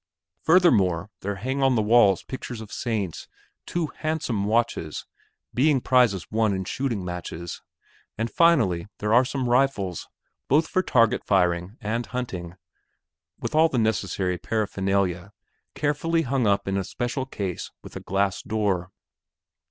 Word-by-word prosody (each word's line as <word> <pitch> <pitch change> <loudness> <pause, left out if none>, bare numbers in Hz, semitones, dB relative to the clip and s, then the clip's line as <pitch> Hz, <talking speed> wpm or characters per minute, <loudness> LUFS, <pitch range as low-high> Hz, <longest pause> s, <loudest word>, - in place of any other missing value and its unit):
Furthermore 105 - +3
there 100 +1 -3
hang 130 +7 -3
on 135 -1 +4
the 110 - +3
walls 105 -4 +5
pictures 125 -3 -6
of 110 -2 -9
saints, 105 -8 -3 0.4
two 170 -3 -2
handsome 155 -10 -1
watches, 110 -8 -1 0.5
being 140 +2 +3
prizes 120 -8 +2
won 110 -2 +2
in 95 0 -3
shooting 115 -3 -2
matches, 85 -1 -6 0.6
and 115 +1 -2
finally 115 - +3
there 105 +1 0
are 120 +2 +7
some 130 -1 -2
rifles 120 - +1 0.4
both 155 +4 +3
for 185 - +1
target 115 - +2
firing 90 +2 +1
and 115 +2 -2
hunting, 95 -9 -5 0.8
with - - -4
all 160 +1 +5
the 130 - -2
necessary 100 -5 0
paraphernalia, 100 -2 -1 0.4
carefully 165 +3 0
hung 130 -4 0
up 100 -1 +1
in 95 0 0
a 95 - 0
special 120 +6 -3
case 95 -8 -4
with - - -12
a - - -4
glass 100 0 -1
door. 100 -5 -1
110 Hz, 140 wpm, -25 LUFS, 95-130 Hz, 0.8 s, are